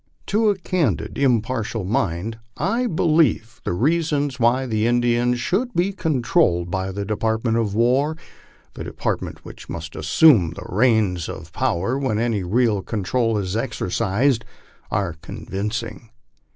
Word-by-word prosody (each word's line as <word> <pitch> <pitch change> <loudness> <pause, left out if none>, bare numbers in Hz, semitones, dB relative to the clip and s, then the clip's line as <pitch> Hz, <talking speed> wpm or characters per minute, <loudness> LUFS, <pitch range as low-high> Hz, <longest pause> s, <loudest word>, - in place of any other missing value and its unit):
To 215 +1 +2
a 205 - +2
candid, 165 - -1
impartial 115 -4 0
mind 105 0 -1 0.2
1 225 - 0
believe 155 -9 +2
the - - -2
reasons 145 - 0
why 120 +3 +3
the 110 -2 0
Indians 120 0 +2
should 235 - -1
be 185 +3 +1
controlled 125 - +1
by 95 +1 -2
the 100 +1 -4
Department 110 +2 0
of 105 -3 -1
War, 130 +7 +2 0.6
the - - -7
department - - -4
which - - -11
must 80 -1 -6
assume 85 - +5
the - - -8
reins 105 -5 +2
of - - -8
power 100 +11 0
when 130 -6 0
any 115 -2 0
real 105 +2 +2
control 115 +3 0
is 95 -1 -2
exercised, 115 +2 0 0.5
are 85 - -1
convincing. 110 +6 -5
115 Hz, 135 wpm, -22 LUFS, 100-140 Hz, 0.6 s, assume